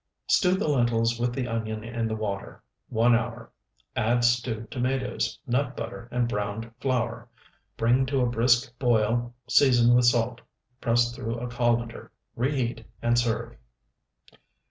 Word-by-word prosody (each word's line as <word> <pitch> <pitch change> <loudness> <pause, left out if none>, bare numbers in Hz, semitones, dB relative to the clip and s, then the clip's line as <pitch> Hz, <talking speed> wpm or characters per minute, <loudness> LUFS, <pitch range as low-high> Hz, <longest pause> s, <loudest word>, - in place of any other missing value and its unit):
Stew 180 -1 +3
the 190 - -1
lentils 120 -4 +1
with 120 0 +1
the 125 0 -3
onion 110 -2 -3
in 115 0 -2
the 110 - -2
water 100 -3 -5 0.3
one 115 +2 +3
hour; 115 0 -2 0.4
add 120 +2 +1
stewed 120 -2 0
tomatoes, 130 0 -1
nut 135 +1 -1
butter, 115 +1 -6
and 120 -1 +1
browned 105 +1 -3
flour; 120 -4 -2 0.5
bring 125 +3 +3
to 135 0 +1
a - - +3
brisk 120 +2 +2
boil, 120 0 +1
season 120 -3 +5
with 125 0 +5
salt, 120 0 +2 0.4
press 120 -1 +1
through 115 -1 -4
a 120 +1 -4
colander, 120 -1 -1 0.2
reheat, 125 -2 -1 0.2
and 120 0 +3
serve. 120 -2 -2
120 Hz, 140 wpm, -26 LUFS, 115-125 Hz, 0.5 s, season